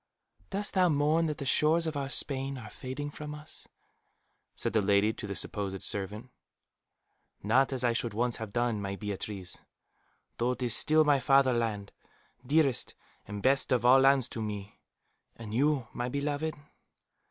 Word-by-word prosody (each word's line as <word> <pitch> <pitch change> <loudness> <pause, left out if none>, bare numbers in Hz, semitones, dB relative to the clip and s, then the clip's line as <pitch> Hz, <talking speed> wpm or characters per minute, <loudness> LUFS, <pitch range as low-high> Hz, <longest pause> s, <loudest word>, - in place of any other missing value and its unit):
"Dost 200 +1 +1
thou 185 -2 +4
mourn 155 +2 +2
that 150 -1 -3
the 140 - -5
shores 155 +5 +3
of 160 -2 -3
our 140 -1 -3
Spain 135 -1 -1
are 110 -4 -9
fading 145 +3 -6
from 150 0 -7
us?" 150 0 -9 0.9
said - - -1
the 110 - +3
lady 100 +2 +3
to 105 - -7
the 100 - -4
supposed 95 -1 -2
servant. 105 +5 -3 1.1
"Not 130 +7 +3
as 130 -2 -2
I 120 -1 +3
should 115 -3 -2
once 120 +1 0
have 110 -2 -6
done, 120 -2 0
my 100 0 -3
Beatriz; 100 -2 -5 0.8
though 120 +2 +1
it 125 - -6
is 120 -2 +1
still 155 +1 +4
my 145 -2 +4
fatherland, 120 -6 +2 0.5
dearest 140 -1 +1 0.3
and 100 0 -6
best 135 +1 +3
of 120 -2 +2
all 130 +2 +7
lands 135 -2 +5
to 115 - -5
me. 105 -2 -6 0.6
And 110 -2 -8
you, 135 0 +1
my 120 0 -3
beloved?" 145 +3 -2
125 Hz, 165 wpm, -30 LUFS, 110-145 Hz, 1.1 s, all